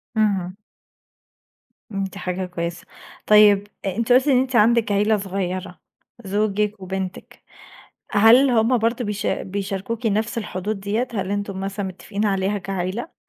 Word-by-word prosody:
اهم. 195 -4 0 1.4
امم، 195 0 -2
دي 195 +1 -6
حاجة 185 +1 -3
كويسة، 170 -1 -5 0.4
طيب 210 -1 +6 0.2
أنتِ 220 +6 -1
قُلتِ 255 +3 +5
إن 265 -3 +5
أنتِ 260 -1 -1
عندِك 230 -1 +4
عيلة 210 +2 +3
صغيرة، 185 -1 -4 0.5
زوجِك 210 +1 0
وبنتِك، 190 0 -6 0.7
هل 230 +6 +6
هم 235 +1 +3
برضه 230 +1 0
بيشا 205 -1 -2
بيشاركوكِ 200 +4 -4
نَفْس 220 +2 0
الحدود 205 -1 -3
ديَّة 215 +6 -1
هل 195 -2 -2
أنتم 200 -1 -3
مثلًا 195 +1 -3
متفقين 200 +3 -4
عليها 195 0 0
كعيلة؟ 195 - -4
205 Hz, 130 wpm, -22 LUFS, 190-220 Hz, 1.4 s, طيب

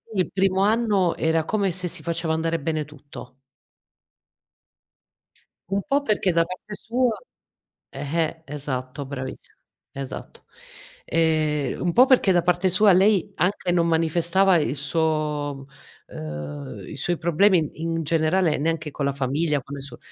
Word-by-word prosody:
il 185 - +1
primo 190 0 +2
anno 210 -5 +2
era 160 0 +1
come 200 -4 0
se 180 +1 -4
si - - -7
faceva 165 -1 -1
andare 165 +1 0
bene 155 +1 -1
tutto. 145 -3 -12 2.3
Un 195 0 0
po' 285 -1 +2
perché 210 -7 +1
da 165 0 +3
parte 185 +4 -7
sua, 240 +1 0 0.7
eh-eh, 160 +3 -2
esatto 140 -1 -5
bravis 130 -1 -7 0.4
esatto. 135 -1 -8 0.6
Ehm, 155 -4 0
un 175 - +1
po' 250 +9 +6
perché 255 -7 +4
da 175 - +4
parte 180 +1 +2
sua 195 +2 +5
lei 195 +1 +3
anche 180 -1 0
non 170 -1 +2
manifestava 170 +4 +3
il 150 -4 +1
suo 150 -2 -1 0.4
ehm, 75 -3 -7
i - - -8
suoi 175 -1 -1
problemi 170 -1 +2
in 165 0 -1
generale 160 +2 +2
neanche 160 +1 -1
con 140 - -4
la 140 - +1
famiglia, 140 +2 0
con 140 +3 -8
il 140 - -7
suo 140 - -9
165 Hz, 140 wpm, -24 LUFS, 145-185 Hz, 2.3 s, po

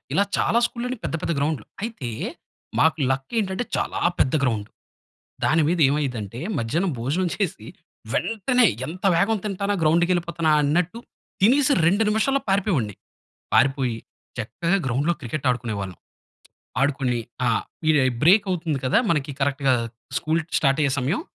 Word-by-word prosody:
ఇలా 200 - +3
చాలా 230 - +2
స్కూల్‌లో 250 +2 -4
పెద్ద - - -3
పెద్ద - - 0
గ్రౌండ్‌లు. 140 -5 -1 0.2
అయితే 220 - -4 0.7
మాకు 160 0 +4
లక్కేంటంటే 190 - -1
చాలా - - -2 0.2
పెద్ద 130 - +3
గ్రౌండు. 110 -6 0 0.8
దాని 160 0 +3
మీద 175 0 +1
ఏమైదంటే 125 -6 -2 0.2
మధ్యాహ్నం 160 +11 0
భోజనం 155 +10 0
చేసి 160 - -3 0.5
వెంటనే, 235 +3 +2 0.2
ఎంత 180 +6 -8
వేగం 210 +5 +2
తింటానా, 200 0 -1
గ్రౌండ్‌కెళ్ళిపోతానా 170 0 +2
అన్నట్టు 175 +8 0 0.4
తినేసి 270 +7 +5
2 200 +6 +3
నిమిషాల్లో 270 +6 +2
పారిపోయేవాడిని. 185 - +1 0.6
పారిపోయి, 135 -3 +3 0.4
చక్కగా 170 - 0
గ్రౌండ్‌లో 140 +7 +1
క్రికెట్ 135 +3 -4
ఆడుకునే 120 -2 -2
వాళ్ళం. 95 -2 -6 0.8
ఆడుకొని 135 -3 +1 0.3
ఆ! - - +4 0.4
ఇది 150 -2 +4 0.2
బ్రేక్ 195 +6 +6
అవుతుంది 160 -5 -1
కదా! 130 - +3
మనకి, 150 -3 0
కరెక్ట్‌గా 140 -1 +2 0.5
స్కూల్ 160 +2 0 0.2
స్టార్ట్ 140 0 +2
అయ్యే 140 - +2
సమయం, 140 - 0
160 Hz, 130 wpm, -23 LUFS, 135-195 Hz, 0.8 s, బ్రేక్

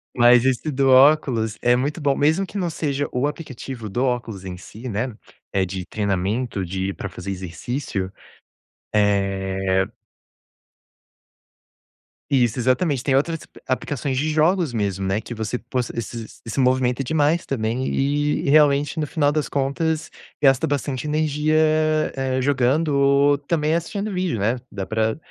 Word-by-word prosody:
Mas 120 0 +6
esse 130 +3 +1
do 135 -1 +2
óculos 130 -5 +4
é 120 - +4
muito 145 +6 -2
bom, 140 -2 +2
mesmo 160 +7 +2
que 205 - -8
não 180 -3 -1
seja 145 -3 -2
o 125 +3 +1
aplicativo 135 -6 -7
do 120 +6 -1
óculos 120 -6 -2
em 90 -1 -6
si, 110 +7 -9
né, 115 +2 -2 0.4
é 95 - +2
de 95 0 -5
treinamento 100 +2 -1
de 95 +2 -3
para 100 - -5
fazer 90 +1 -6
exercício. 95 - -4 0.8
Eh 95 -2 +1 2.5
Isso, 120 -3 +3
exatamente, 130 +3 +1
tem 135 - +1
outras 160 +5 +1
ap - - -19
aplicações 130 0 -2
de 150 +4 0
jogos 160 +1 +2
mesmo, 100 -4 -2
né, 95 +2 0
que 115 +2 -8
você 110 +2 -3
possa 125 0 -3
esses 115 0 -7
e - - -7
se 135 - 0
movimenta 130 0 +2
demais 155 +4 +1
também, 120 0 -1
e 145 +1 0
realmente, 145 0 +4
no - - 0
final 145 -1 +1
das 155 -1 -1
contas, 155 +3 -1 0.3
gasta 135 -2 +4
bastante 140 -1 -2
energia, 155 0 +1 0.6
eh, 130 -1 -1
jogando 140 +3 +2
ou 140 +1 +4
também 150 +2 0
assistindo 200 +5 -3
vídeo, 180 - -1
né, 110 +5 +1 0.2
dá 95 -1 -4
pra 110 +3 0
130 Hz, 150 wpm, -22 LUFS, 110-145 Hz, 2.5 s, Mas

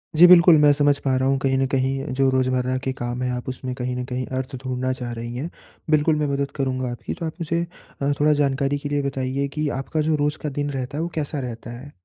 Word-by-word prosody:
जी, 175 +3 +9
बिल्कुल, 175 -2 +8
मैं 150 -1 +6
समझ 145 0 +3
पा 135 -2 0
रहा 130 +1 +1
हूँ 135 - +2
कहीं 135 0 +1
न 135 - +2
कहीं 135 +1 0
जो 135 -1 +4
रोज़मर्रा 130 0 +1
के 130 - -1
काम 120 0 -4
हैं 125 - 0
आप 125 +1 -4
उसमें 130 0 -4
कहीं 125 -1 -3
न 125 - -3
कहीं 125 0 -3
अर्थ 130 0 -4
ढूँढना 130 0 -1
चाह 125 -2 -5
रही 120 +1 -6
हैं। 150 +7 -4 0.4
बिल्कुल 155 0 +3
मैं 150 - +1
मदद 140 0 -1
करूँगा 130 -3 -1
आपकी, 120 - -5
तो 165 - -5
आप 160 - -3
मुझे 170 +1 0 0.4
अ, 140 +1 +2
थोड़ा 150 +1 +4
जानकारी 140 0 +1
के 145 - -5
लिए 145 0 +1
बताइए 135 +1 -2
कि 150 -1 -1
आपका 155 +3 -2
जो 155 - +3
रोज़ 150 +1 -1
का 150 - -1
दिन 145 0 -1
रहता 135 +2 -4
है - - -1
वो 170 - -3
कैसा 150 -1 -2
रहता 120 -2 -6
है? 145 +2 -11
135 Hz, 255 wpm, -23 LUFS, 130-145 Hz, 0.4 s, जी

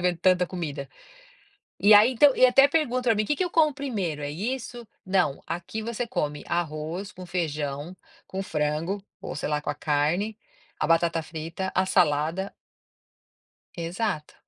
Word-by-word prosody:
vendo 180 -1 +1
tanta 180 0 +3
comida?". 150 -7 -5 0.9
E 210 +1 +7
aí, 215 +5 +8
então 270 +3 +5
e 255 - +7
até 270 +2 +6
perguntam 275 -5 0
para 230 -3 +3
mim: 215 - +1
"Que 295 - 0
que 370 - 0
eu 355 - -2
como 310 -4 +3
primeiro, 200 - -3
é 145 - -3
isso?". 240 - -4 0.2
"Não, 180 -7 +1
aqui 175 +6 -4
você 235 +2 -3
come 150 -8 -2
arroz 170 +3 -3
com 185 - -10
feijão, 155 -2 -3 0.3
com 190 +1 -4
frango, 155 +5 -2 0.2
ou - - -6
sei 145 - -3
lá 150 0 +1
com - - -5
a - - -7
carne, 160 +9 0 0.4
a - - +1
batata 165 0 +2
frita, 165 +4 -5
a 185 - +3
salada" 170 +1 +1 1.2
Exato. 170 -1 -3
180 Hz, 160 wpm, -26 LUFS, 155-220 Hz, 1.2 s, aí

